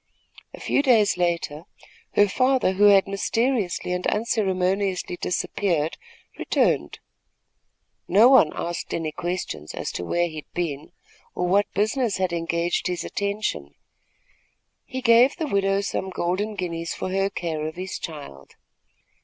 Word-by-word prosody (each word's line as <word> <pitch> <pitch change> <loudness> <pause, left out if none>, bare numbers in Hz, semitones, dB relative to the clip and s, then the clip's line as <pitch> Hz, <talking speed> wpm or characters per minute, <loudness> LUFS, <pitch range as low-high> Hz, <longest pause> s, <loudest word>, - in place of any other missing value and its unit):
A - - -14
few - - +1
days 230 -8 +4
later, 170 -3 -1 0.5
her 205 - +5
father, 255 0 +2
who 205 +2 +3
had 200 -1 +6
mysteriously 210 -1 -1
and 180 0 -2
unceremoniously 195 -4 0
disappeared, 175 -3 -1 0.4
returned. - - +1 1.1
No 210 +6 +6
one 260 - +6
asked 170 0 -4
any 160 -2 -2
questions 175 - -4
as - - -4
to - - -5
where 175 - +1
he 155 -2 -9
had 155 - -9
been, 155 -5 -3 0.4
or 180 - -1
what 200 +3 +2
business 215 +2 +1
had 185 -2 -1
engaged 170 +1 -1
his 180 -2 -2
attention. 200 - -3 1.1
He 260 0 -6
gave 240 +3 +5
the 325 - -3
widow 195 -5 +1
some 190 -1 -3
golden 190 +4 -2
guineas 170 -3 -4
for 185 - -4
her 195 +1 +1
care 160 -5 -3
of 160 - -7
his 185 +2 -5
child. 140 - -9
185 Hz, 135 wpm, -24 LUFS, 170-205 Hz, 1.1 s, had